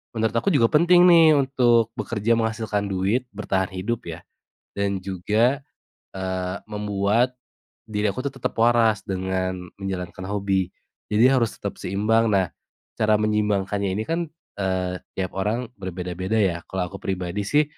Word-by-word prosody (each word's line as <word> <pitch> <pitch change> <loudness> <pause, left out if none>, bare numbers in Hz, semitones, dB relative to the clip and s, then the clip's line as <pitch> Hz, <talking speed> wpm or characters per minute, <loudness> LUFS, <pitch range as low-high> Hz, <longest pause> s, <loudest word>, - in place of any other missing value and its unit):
menurut 110 -1 +1
aku 115 +10 -2
juga 115 -4 +4
penting 175 +3 +6
nih 165 -3 +7
untuk 120 -5 +3
bekerja 110 +1 -1
menghasilkan 110 -2 -1
duit 100 +7 0
bertahan 95 -3 0
hidup 105 +1 -3
ya 85 +1 -7 0.5
dan 100 -1 -1
juga, 105 +9 0 0.5
eee, 95 0 -3
membuat 105 +4 0 0.5
diri 105 -1 0
aku 135 +2 -3
tuh - - -19
tetep - - -2
waras 115 -3 +4
dengan 95 -1 -2
menjalankan 95 -1 -4
hobi, 95 -3 0 0.4
jadi 120 +6 +5
harus 115 -5 +1
tetap - - -5
seimbang. 110 +4 +2
Nah, 95 -4 +2 0.5
cara 110 0 +4
menyeimbangkannya 105 -2 0
ini 110 - -1
kan, 165 +1 -1 0.4
eee, 95 -2 -1 0.2
tiap 95 -1 -2
orang 105 +6 -1 0.2
berbeda-beda 95 +3 -3
ya. 90 -5 +1
Kalau 95 -1 -1
aku - - -5
pribadi 95 +1 -3
sih 150 +5 +4
105 Hz, 140 wpm, -24 LUFS, 95-115 Hz, 0.5 s, nih